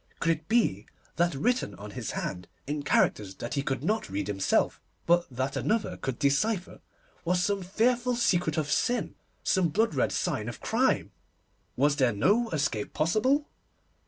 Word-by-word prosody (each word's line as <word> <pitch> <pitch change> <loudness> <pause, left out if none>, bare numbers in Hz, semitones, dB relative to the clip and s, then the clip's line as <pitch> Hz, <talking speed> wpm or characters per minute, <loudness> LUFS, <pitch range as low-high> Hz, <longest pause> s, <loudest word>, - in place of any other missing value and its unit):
Could 165 - +2
it 160 0 -3
be 210 - +1 0.3
that 175 -3 +2
written 245 - 0
on 105 +1 -9
his - - -5
hand, 90 0 -4 0.2
in 145 +1 -2
characters 105 -7 +1
that 120 - -5
he 140 - 0
could 135 -1 -2
not 215 - 0
read 100 +1 -2
himself, 95 -1 +1 0.2
but 175 +1 +3
that 130 +2 -3
another 220 0 0
could 135 -2 -4
decipher, 175 +8 0 0.4
was 180 +1 +1
some 200 0 0
fearful 240 +6 +1
secret 175 -8 +1
of 150 -2 -1
sin, 245 0 0 0.3
some 185 -4 +2
blood 215 +5 +1
red 135 - +1
sign - - -1
of - - -8
crime? - - +1 0.6
Was 145 +2 +2
there 130 -4 +3
no 210 - +2
escape 140 -9 -2
possible? 255 - +2
160 Hz, 160 wpm, -28 LUFS, 135-215 Hz, 0.6 s, but